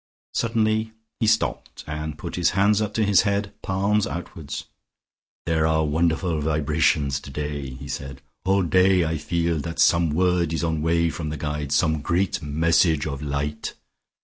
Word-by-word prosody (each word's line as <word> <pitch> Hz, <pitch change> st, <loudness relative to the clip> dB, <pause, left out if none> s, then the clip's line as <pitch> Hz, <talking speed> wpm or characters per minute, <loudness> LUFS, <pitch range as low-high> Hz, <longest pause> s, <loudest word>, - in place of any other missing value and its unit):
Suddenly 110 Hz, -1 st, 0 dB, 0.3 s
he 110 Hz, -, +1 dB
stopped, 110 Hz, +1 st, 0 dB
and 75 Hz, 0 st, -5 dB
put -, -, -6 dB
his 90 Hz, -1 st, +2 dB
hands 105 Hz, +2 st, +4 dB
up 105 Hz, -1 st, -3 dB
to 110 Hz, -, +2 dB
his 100 Hz, -3 st, +5 dB
head, 100 Hz, 0 st, -1 dB
palms 100 Hz, +2 st, +1 dB
outward. 80 Hz, -1 st, -7 dB, 0.9 s
"There 80 Hz, -1 st, +2 dB
are 80 Hz, 0 st, +2 dB
wonderful 80 Hz, +1 st, 0 dB
vibrations 75 Hz, -2 st, +1 dB
today," 75 Hz, 0 st, -5 dB
he 65 Hz, +2 st, -9 dB
said. 70 Hz, 0 st, -6 dB, 0.2 s
"All 95 Hz, 0 st, +2 dB
day 90 Hz, 0 st, +4 dB
I 80 Hz, 0 st, -2 dB
feel 85 Hz, -1 st, 0 dB
that 80 Hz, +3 st, -5 dB
some 85 Hz, -1 st, +4 dB
word 85 Hz, +1 st, +1 dB
is 80 Hz, -, -1 dB
on 80 Hz, -2 st, 0 dB
way 85 Hz, +1 st, +2 dB
from 80 Hz, -2 st, -4 dB
the 75 Hz, -, -4 dB
Guides, 75 Hz, -1 st, -2 dB
some 80 Hz, -3 st, +2 dB
great 90 Hz, +3 st, 0 dB
message 80 Hz, +1 st, +2 dB
of 70 Hz, -2 st, -4 dB
light." 75 Hz, +1 st, -3 dB
80 Hz, 160 wpm, -24 LUFS, 75-95 Hz, 0.9 s, his